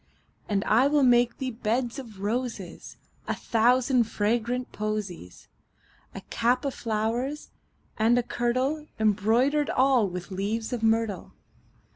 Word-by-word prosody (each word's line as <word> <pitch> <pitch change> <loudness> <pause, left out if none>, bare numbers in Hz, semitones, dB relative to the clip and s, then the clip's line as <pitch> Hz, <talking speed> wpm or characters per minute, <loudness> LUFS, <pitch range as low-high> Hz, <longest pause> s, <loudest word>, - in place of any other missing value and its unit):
And 200 -1 +1
I 240 +5 +4
will 290 -1 +3
make 240 -1 +4
thee 260 -1 -3
beds 235 +3 -2
of 220 -7 -10
roses 215 -4 -4 0.3
And - - -2
a - - -16
thousand 245 +2 +3
fragrant 235 +3 -1
posies; 200 - -5 0.7
10 - - -7
A - - -39
cap 245 +3 +1
of 275 - -1
flowers, 230 +6 -2 0.5
and 230 +3 +4
a 245 - +2
kirtle 255 +6 -1
Embroider'd 225 +8 +2
all 255 -6 +3
with 180 +2 -7
leaves 215 +5 -2
of 240 - -3
myrtle. 225 -4 0
230 Hz, 135 wpm, -26 LUFS, 215-255 Hz, 0.7 s, I